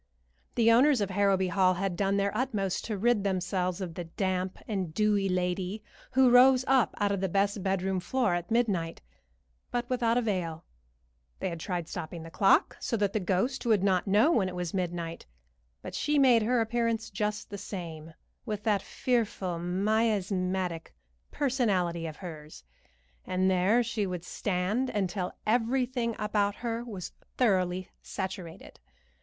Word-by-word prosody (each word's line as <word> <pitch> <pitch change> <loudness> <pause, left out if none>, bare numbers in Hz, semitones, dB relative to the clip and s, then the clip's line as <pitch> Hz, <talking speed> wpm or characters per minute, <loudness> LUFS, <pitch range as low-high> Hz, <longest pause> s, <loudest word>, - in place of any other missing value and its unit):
The 230 -1 +5
owners 260 +3 +5
of 200 -2 -1
Harrowby 195 -1 +2
Hall 185 0 +3
had 190 0 -2
done 195 +2 +1
their 200 +1 0
utmost 210 -6 -1
to 215 -3 -3
rid 230 0 +2
themselves 185 -1 -1
of 175 -3 -4
the 175 +1 -5
damp 185 +2 -2
and 190 -6 -2
dewy 205 -2 +2
lady 180 +3 -1 0.3
who 260 -1 +5
rose 255 +1 +6
up 265 -3 +3
out 205 -1 +1
of 200 -2 -1
the 190 - 0
best 200 +2 +1
bedroom 190 0 0
floor 225 +2 0
at 175 0 -3
midnight, 200 -9 0 0.7
but 240 0 -2
without 240 -2 +2
avail. 180 -9 -2 0.7
They 190 - -2
had 170 -1 -6
tried 175 -1 -3
stopping 165 0 -6
the 165 - -10
clock, 195 +3 +3
so 230 - -1
that 205 -1 0
the 215 - +1
ghost 195 +8 0
would 215 -4 +3
not 190 -1 +2
know 210 +11 +4
when 200 - +2
it 180 - -7
was 175 -2 -3
midnight; 170 - -3 0.6
but - - -7
she 295 0 0
made 255 -5 +6
her 235 +2 +2
appearance 225 0 -1
just 210 +1 -3
the 200 - -5
same, 165 -5 -7 0.3
with 210 -3 -4
that 210 -3 +2
fearful 205 -10 -1
miasmatic 185 - 0 0.3
personality 195 - 0
of 155 - -7
hers, 155 -4 -9 0.6
and 185 +1 +1
there 195 +7 +3
she 215 -3 -2
would 180 -2 -4
stand 205 +9 -1
until 190 -2 -2
everything 240 +1 +1
about 210 -1 0
her 235 0 -3
was 205 -7 -7 0.3
thoroughly 185 -6 +1
saturated. 185 -3 -6
195 Hz, 155 wpm, -29 LUFS, 180-225 Hz, 0.7 s, rose